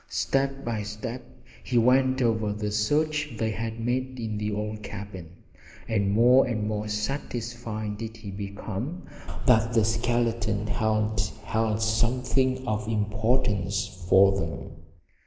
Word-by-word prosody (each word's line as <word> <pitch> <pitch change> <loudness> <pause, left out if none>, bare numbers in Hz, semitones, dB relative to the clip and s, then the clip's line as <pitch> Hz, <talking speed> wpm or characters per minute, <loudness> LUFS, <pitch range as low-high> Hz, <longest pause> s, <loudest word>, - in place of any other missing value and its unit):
Step 135 0 0
by 115 -3 -1
step 105 +4 -5 0.4
he 125 - 0
went 130 +2 +4
over 110 -3 +1
the 105 0 -3
search 150 +6 +1
they 110 0 0
had 115 +1 -4
made 130 +2 -1
in 110 -2 -3
the 105 0 -1
old 105 +1 -3
cabin, 100 -4 -7 0.6
and 100 -3 +1
more 125 +5 +6
and 110 -3 -1
more 105 0 -2
satisfied 110 -1 -3
did 115 0 -6
he 105 -3 -8
become 100 - -5 0.4
that 115 -2 +4
the 110 -2 +4
skeleton 115 -2 0
hand 110 0 0
held 110 -1 0
something 130 +3 +1
of 105 0 -1
importance 105 -3 0
for 95 0 +7
them. 80 -5 -4
110 Hz, 130 wpm, -27 LUFS, 105-120 Hz, 0.6 s, for